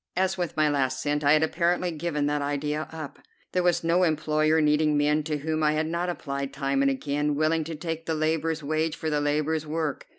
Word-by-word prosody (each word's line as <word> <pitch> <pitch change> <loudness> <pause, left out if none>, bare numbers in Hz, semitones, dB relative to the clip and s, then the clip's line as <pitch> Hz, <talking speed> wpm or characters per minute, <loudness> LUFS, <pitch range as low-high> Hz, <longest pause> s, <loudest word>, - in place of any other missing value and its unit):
As 190 +1 +1
with 175 -3 -4
my 155 0 +4
last 130 -3 0
cent, 150 0 -1
I 145 +1 +5
had 155 0 +4
apparently 175 +2 +1
given 155 -2 -2
that 145 0 0
idea 150 +2 -2
up. 160 -3 -8 0.3
There 180 - +1
was 175 -1 +2
no 170 +2 +2
employer 155 -1 +2
needing 150 0 +3
men 150 +1 +2
to 150 -1 -1
whom 155 +2 -2
I 150 0 +3
had 155 +1 0
not 170 +2 -2
applied 140 -5 -4
time 140 -1 0
and 140 - +4
again, 145 +2 -1
willing 155 +2 +1
to 165 0 -5
take 165 +1 -5
the 160 - 0
laborer's 160 0 0
wage 155 +2 -1
for 160 - -3
the 150 -1 +1
laborer's 155 +1 0
work. 155 -2 -3
155 Hz, 220 wpm, -26 LUFS, 145-160 Hz, 0.3 s, I